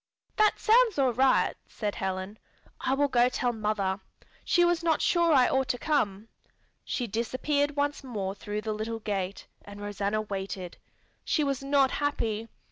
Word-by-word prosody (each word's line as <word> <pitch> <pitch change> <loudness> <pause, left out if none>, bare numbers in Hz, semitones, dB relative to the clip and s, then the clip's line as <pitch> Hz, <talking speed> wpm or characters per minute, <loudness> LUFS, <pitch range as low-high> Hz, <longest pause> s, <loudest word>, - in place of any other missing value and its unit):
'" - - -46
"That 430 0 +4
sounds 460 -3 +4
all 265 -3 +3
right," 260 +2 +3
said 210 -2 -3
Helen. 190 +2 -4 0.4
"I 265 - 0
will 285 +1 +2
go 245 -2 +3
tell 245 -1 -1
mother. 210 -3 -1 0.4
She 350 -1 +3
was 345 -1 +2
not 325 -3 +2
sure 340 -1 +3
I 260 -4 +6
ought 265 0 +1
to 245 - 0
come." 220 -9 0 0.6
She 245 - -2
disappeared 270 +6 -1
once 290 0 -1
more 205 -7 -3
through 205 +1 -5
the 215 0 -2
little 225 +1 -4
gate, 200 -3 -3 0.2
and 205 0 -11
Rosanna 205 +1 -2
waited. 190 -3 -5 0.5
She 305 - +1
was 275 -2 -1
not 275 -1 +3
happy. 230 -7 -1
240 Hz, 165 wpm, -28 LUFS, 205-285 Hz, 0.6 s, I